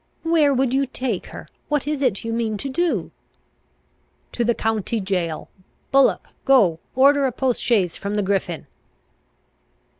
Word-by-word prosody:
"Where 325 -3 +3
would 260 -1 +1
you 275 0 +1
take 250 -6 -3
her? - - -10 0.2
What 295 -2 0
is 295 -1 -2
it 245 -8 0
you 230 0 -3
mean 225 -2 -1
to 275 - -5
do?" 340 +6 -1 1.2
"To 240 - -1
the 235 0 +1
county 225 0 -1
jail. 180 -5 -2 0.4
Bullock, 275 0 +3
go, 205 -12 +4 0.2
order 275 +1 +5
a - - -2
post 255 0 -1
chaise 195 -8 +1
from 200 +1 -4
the 210 - +1
Griffin!" 190 -4 -1
240 Hz, 150 wpm, -22 LUFS, 200-275 Hz, 1.2 s, order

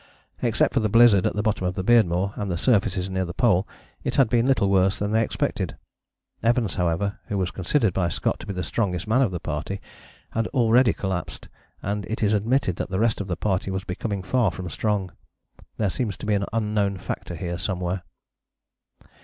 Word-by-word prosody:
Except - - +2
for - - +3
the 110 -1 0
blizzard 115 -3 +6
at - - -2
the 105 - 0
bottom 105 -4 0
of 90 - -2
the 95 - -2
Beardmore 100 -4 +3
and 100 -1 -3
the 85 - -1
surfaces 100 -4 +1
near 95 0 -1
the 85 -1 -6
Pole 105 -6 +3 0.4
it - - -2
had 135 -5 +4
been 120 0 +3
little 130 -7 +3
worse 95 0 +3
than 105 0 -2
they 110 +1 +3
expected. 115 - -2 0.6
Evans, 115 -3 +2
however, 90 +3 -1
who 100 - -2
was 95 -2 -1
considered 100 - +1
by 90 -2 +1
Scott - - -1
to - - -10
be 100 - -3
the 90 -1 -3
strongest 90 +3 -1
man 120 +5 +3
of 125 - +3
the 90 -1 -4
party, 80 +6 -4 0.5
had 115 0 0
already 120 -1 +5
collapsed, 95 -3 -4 0.3
and 100 +1 -2
it 110 +1 -3
is 105 0 +3
admitted 105 -3 +1
that - - -3
the 95 0 -1
rest 115 -2 +1
of 100 - -5
the 90 -3 -2
party 95 0 -1
was 95 0 -2
becoming 100 +1 -3
far 120 +5 +2
from 90 -2 -6
strong. 105 -4 -1 0.7
There 105 -4 +1
seems 110 -6 -2
to - - -7
be 105 - +1
an 100 -1 +1
unknown 105 -3 0
factor 90 -1 -5
here 85 +1 -4
somewhere. 90 -1 -2
100 Hz, 205 wpm, -24 LUFS, 90-110 Hz, 0.7 s, blizzard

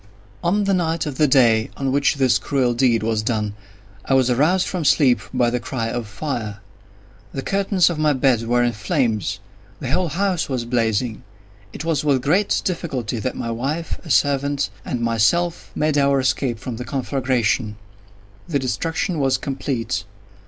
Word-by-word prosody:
On 200 +5 +2
the 200 0 +1
night 165 -3 0
of 145 -4 -5
the 150 - +5
day 115 -5 +4
on 135 -1 -1
which 140 +1 +2
this 130 -3 +3
cruel 130 -4 +1
deed 120 -2 +2
was 110 -1 0
done, 110 -2 -1 0.5
I 135 - +1
was 130 -1 +3
aroused 160 +9 +3
from 180 -3 -2
sleep 135 -5 +4
by 125 -2 +2
the 125 - 0
cry 115 -2 -3
of 120 -3 -3
fire. 105 -1 -4 0.7
The 135 - -4
curtains 195 -3 +2
of 170 -3 -1
my 155 -1 +3
bed 130 -3 +2
were 120 +1 +3
in 120 - +2
flames. 105 -1 -1 0.4
The 130 - -4
whole 180 +4 +1
house 180 +1 -1
was 125 -3 -2
blazing. 115 -1 0 0.5
It 155 - -7
was 160 -4 0
with 135 -4 +2
great 185 +9 +2
difficulty 130 - -2
that 130 +3 -3
my 115 - -3
wife, 140 +8 -3
a 165 - -10
servant, 140 -7 +1
and 125 - -3
myself, 115 +10 +1
made 150 -1 +1
our 140 -1 +3
escape 130 -2 0
from 115 +2 -6
the 125 - -5
conflagration. 130 -5 0 0.7
The 155 - 0
destruction 165 - -2
was 135 -2 +2
complete. 125 -7 -3
130 Hz, 170 wpm, -21 LUFS, 120-155 Hz, 0.7 s, the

